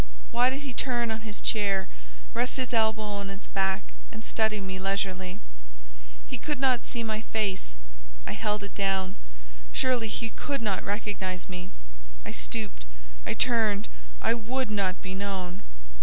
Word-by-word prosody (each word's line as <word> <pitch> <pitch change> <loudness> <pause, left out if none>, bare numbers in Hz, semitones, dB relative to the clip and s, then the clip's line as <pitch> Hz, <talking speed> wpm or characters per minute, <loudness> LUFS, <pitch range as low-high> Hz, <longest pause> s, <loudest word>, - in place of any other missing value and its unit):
why 245 +1 +5
did 270 +2 -2
he 275 -3 -4
turn 240 -2 +2
on 220 0 -2
his 215 -1 -4
chair, 200 -3 +3 0.5
rest 250 - +1
his 255 -1 0
elbow 220 -1 +4
on 200 -1 -2
its 195 0 -6
back, 190 0 +1 0.3
and 220 0 -7
study 220 -2 +2
me 190 -1 -3
leisurely? 190 -1 0 0.9
He - - -4
could 295 -3 -1
not 260 -2 +4
see 235 - -1
my 220 -1 0
face, 200 - -1 0.5
I - - -2
held 210 -1 0
it 200 - -6
down; 195 -1 +1 0.6
surely, 250 -3 +3
he 225 +1 -2
could 280 -2 -1
not 205 -3 +1
recognise 195 -3 -1
me: 180 -1 -5 0.6
I - - -3
stooped, - - -2 0.4
I - - +1
turned, 220 -4 +4 0.4
I - - +5
would 235 +1 0
not 195 -3 +2
be 190 -1 -2
known. 190 -2 -2
210 Hz, 155 wpm, -30 LUFS, 190-230 Hz, 0.9 s, why